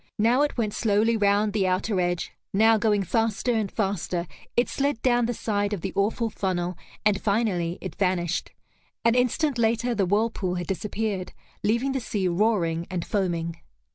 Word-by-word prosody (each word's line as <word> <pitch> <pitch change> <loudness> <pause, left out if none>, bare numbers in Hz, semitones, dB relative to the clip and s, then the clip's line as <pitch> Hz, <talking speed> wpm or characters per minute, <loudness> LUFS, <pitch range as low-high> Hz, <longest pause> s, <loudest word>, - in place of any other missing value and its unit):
Now 235 +5 +3
it 295 -2 0
went 215 -3 0
slowly 220 +1 +2
round 205 0 +2
the 200 -3 +1
outer 185 +2 0
edge, 175 0 -1 0.2
now, 220 +2 +6
going 210 -2 +2
faster 225 +4 0
and 215 -4 -1
faster, 190 -4 -1 0.3
it 240 - +4
slid 280 -3 -1
down 240 -2 +3
the 245 - -1
side 205 -1 -1
of 195 - -3
the 190 - -4
awful 220 +3 0
funnel, 180 -3 -2 0.3
and 205 -2 +3
finally 200 -5 0
it 185 -4 -5
vanished. 180 -3 0 0.6
An 230 - +5
instant 250 +2 +1
later, 235 +2 +2
the 200 -4 +1
whirlpool 205 -2 0
had 175 -1 -3
disappeared, 200 0 -3 0.3
leaving 235 +6 +1
the 265 - -1
sea 205 -5 -1
roaring 175 -3 +1
and 180 -3 -3
foaming. 170 -4 -1
205 Hz, 170 wpm, -26 LUFS, 185-225 Hz, 0.6 s, now